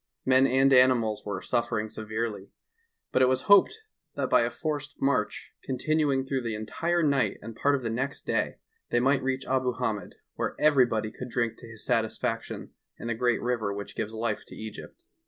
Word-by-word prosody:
Men 130 Hz, +1 st, +5 dB
and 135 Hz, +1 st, +4 dB
animals 120 Hz, -5 st, +4 dB
were 95 Hz, -2 st, -3 dB
suffering 115 Hz, -3 st, 0 dB
severely, 110 Hz, -2 st, -4 dB, 0.6 s
but 130 Hz, -, +2 dB
it 130 Hz, -, +6 dB
was 130 Hz, 0 st, +1 dB
hoped 205 Hz, -, +5 dB, 0.3 s
that -, -, -2 dB
by -, -, +6 dB
a -, -, +1 dB
forced 150 Hz, -2 st, -4 dB
march, 130 Hz, -6 st, 0 dB
continuing 140 Hz, 0 st, 0 dB
through 135 Hz, -1 st, -1 dB
the 115 Hz, -2 st, -3 dB
entire 165 Hz, +11 st, -1 dB
uight 140 Hz, -3 st, +2 dB
and 115 Hz, +1 st, -8 dB
part 145 Hz, +4 st, +2 dB
of 135 Hz, -, -4 dB
the 115 Hz, -, -1 dB
next 130 Hz, +5 st, -3 dB
day, -, -, 0 dB, 0.3 s
they 120 Hz, -, +2 dB
might 135 Hz, +2 st, +3 dB
reach 130 Hz, 0 st, -2 dB
Abu 130 Hz, -1 st, +1 dB
Hamed, 110 Hz, -6 st, -3 dB, 0.2 s
where -, -, -3 dB
everybody 125 Hz, -8 st, +3 dB
could 125 Hz, +2 st, -8 dB
drink 115 Hz, -1 st, -1 dB
to 120 Hz, -, -12 dB
his 110 Hz, -1 st, -8 dB
satisfaction 115 Hz, -3 st, -2 dB, 0.3 s
in 115 Hz, -, -6 dB
the -, -, +1 dB
great 120 Hz, +1 st, +1 dB
river 120 Hz, -4 st, 0 dB
which 100 Hz, 0 st, -7 dB
gives 110 Hz, 0 st, -3 dB
life 110 Hz, -1 st, -2 dB
to -, -, -11 dB
Egypt. 110 Hz, -, -9 dB
125 Hz, 185 wpm, -28 LUFS, 110-135 Hz, 0.6 s, it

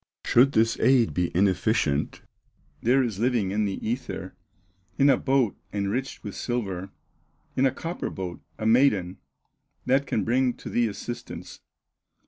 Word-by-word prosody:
"Should 135 Hz, +4 st, +5 dB
this 115 Hz, +1 st, +2 dB
aid 130 Hz, -3 st, +4 dB
be 90 Hz, -1 st, 0 dB
inefficient, 95 Hz, -, +1 dB, 0.6 s
There 130 Hz, +3 st, +3 dB
is 110 Hz, -6 st, -3 dB
living 115 Hz, -5 st, +1 dB
in 105 Hz, +1 st, +1 dB
the 100 Hz, -1 st, -2 dB
ether, 115 Hz, -6 st, -4 dB, 0.6 s
In 140 Hz, 0 st, +5 dB
a -, -, +5 dB
boat 130 Hz, -4 st, +1 dB, 0.2 s
enriched 105 Hz, +7 st, -3 dB
with 105 Hz, -3 st, -6 dB
silver, 100 Hz, -6 st, -3 dB, 0.7 s
In 135 Hz, +1 st, +4 dB
a -, -, +1 dB
copper 165 Hz, +6 st, -4 dB
boat, 90 Hz, -4 st, -6 dB, 0.2 s
a 110 Hz, -, -4 dB
maiden, 110 Hz, -6 st, +3 dB, 0.7 s
That 135 Hz, +2 st, +2 dB
can 110 Hz, -, 0 dB
bring 125 Hz, +1 st, +1 dB
to -, -, -9 dB
thee 120 Hz, -1 st, +2 dB
assistance. 120 Hz, +3 st, -7 dB
115 Hz, 140 wpm, -26 LUFS, 100-130 Hz, 0.7 s, Should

